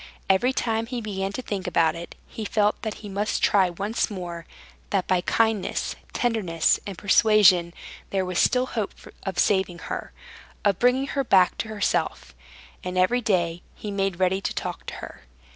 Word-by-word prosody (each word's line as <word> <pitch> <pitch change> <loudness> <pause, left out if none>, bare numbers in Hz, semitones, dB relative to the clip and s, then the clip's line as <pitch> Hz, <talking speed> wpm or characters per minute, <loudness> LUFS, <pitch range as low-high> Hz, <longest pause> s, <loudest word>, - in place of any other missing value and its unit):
Every 215 +7 +3
time 225 -3 -1
he 250 0 -3
began 195 -3 -3
to 255 - -4
think 200 -4 -4
about 165 -3 +3
it, 170 +1 -8
he 220 - -7
felt 210 0 +1
that 220 -2 -3
he - - -5
must 200 +2 -2
try 190 -3 +4
once 200 +8 -1
more, 175 -4 -6 0.4
that 195 -3 0
by 185 -1 +2
kindness, 220 0 0 0.2
tenderness, 200 -9 +1
and 195 -3 -6
persuasion 200 -4 +5 0.4
there 190 -1 0
was 180 -1 -1
still 255 0 +3
hope 220 -5 -3 0.3
of 195 -1 -5
saving 190 -3 +2
her, - - -6 0.5
of 200 -3 +2
bringing 250 +2 +3
her 275 0 -1
back 185 -7 +4
to - - -2
herself, 215 -1 -1 0.5
and 180 0 -4
every 215 +7 +3
day 175 -6 0
he 210 - -6
made 195 -2 -1
ready 190 +1 +2
to - - -3
talk - - -5
to - - -5
her. - - -13
200 Hz, 175 wpm, -25 LUFS, 185-220 Hz, 0.5 s, persuasion